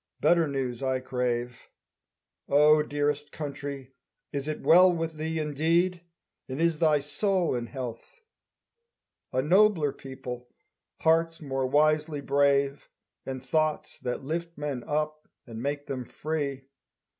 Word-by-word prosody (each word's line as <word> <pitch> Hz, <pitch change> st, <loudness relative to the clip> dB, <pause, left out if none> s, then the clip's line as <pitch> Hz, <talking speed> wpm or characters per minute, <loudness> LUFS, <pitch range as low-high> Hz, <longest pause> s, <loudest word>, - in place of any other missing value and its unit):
Better 170 Hz, -2 st, +4 dB
news 130 Hz, -4 st, -3 dB
I 130 Hz, -1 st, 0 dB
crave. 125 Hz, -1 st, -3 dB, 0.8 s
O 150 Hz, +2 st, +6 dB
dearest 145 Hz, 0 st, -1 dB
country, 140 Hz, -3 st, -6 dB, 0.4 s
is 140 Hz, 0 st, -3 dB
it 155 Hz, -, -3 dB
well 180 Hz, +2 st, +7 dB
with 165 Hz, -1 st, -2 dB
thee 160 Hz, +1 st, -2 dB
Indeed, 165 Hz, +4 st, +1 dB, 0.5 s
and 130 Hz, +3 st, -4 dB
is 165 Hz, -2 st, +2 dB
thy 155 Hz, -3 st, +4 dB
soul 180 Hz, +5 st, 0 dB
in 120 Hz, -1 st, -2 dB
health? 125 Hz, -, -7 dB, 1.1 s
A 130 Hz, -, +1 dB
nobler 180 Hz, -2 st, +4 dB
people, 125 Hz, -2 st, -8 dB, 0.5 s
hearts 165 Hz, 0 st, +3 dB
more 135 Hz, -3 st, -2 dB
wisely 155 Hz, +2 st, +2 dB
brave, 140 Hz, 0 st, +1 dB, 0.4 s
And 130 Hz, -1 st, -5 dB
thoughts 155 Hz, +2 st, -1 dB
that 125 Hz, +2 st, -3 dB
lift 170 Hz, +4 st, -4 dB
men 145 Hz, -4 st, -3 dB
up 155 Hz, +1 st, -2 dB, 0.2 s
and 115 Hz, -2 st, -8 dB
make 145 Hz, +2 st, -2 dB
them 130 Hz, -2 st, -4 dB
free. 140 Hz, -1 st, -3 dB
145 Hz, 125 wpm, -28 LUFS, 135-160 Hz, 1.1 s, well